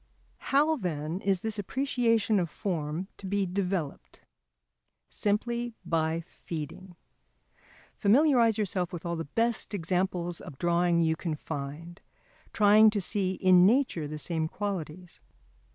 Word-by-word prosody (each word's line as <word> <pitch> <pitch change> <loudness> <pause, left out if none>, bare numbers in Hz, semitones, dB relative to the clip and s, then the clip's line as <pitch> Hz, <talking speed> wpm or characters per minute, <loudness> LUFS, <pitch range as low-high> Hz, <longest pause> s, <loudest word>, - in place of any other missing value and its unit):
How, 300 +3 +2
then, 165 - -3
is 195 -2 0
this 220 -1 -2
appreciation 230 -2 +1
of 170 -3 -1
form 165 -2 -3
to 195 - -8
be 200 0 0
developed? 180 -5 -3 0.9
Simply 235 +3 -1
by 165 -1 0
feeding. 170 +2 -8 1.0
Familiarise 235 0 +4
yourself 185 -4 -1
with 175 -1 -7
all 170 0 -2
the 165 0 -4
best 230 +5 -1
examples 175 -1 -1
of 135 - -10
drawing 170 +1 +2
you 160 -1 +2
can 160 -1 -3
find, 155 +4 -7 0.5
trying 215 +1 +6
to 210 -1 -1
see 190 -1 -1
in 185 -1 +5
nature 225 - +1
the 155 +1 -6
same 160 0 -2
qualities. 180 -3 -5
185 Hz, 125 wpm, -28 LUFS, 165-210 Hz, 1.0 s, trying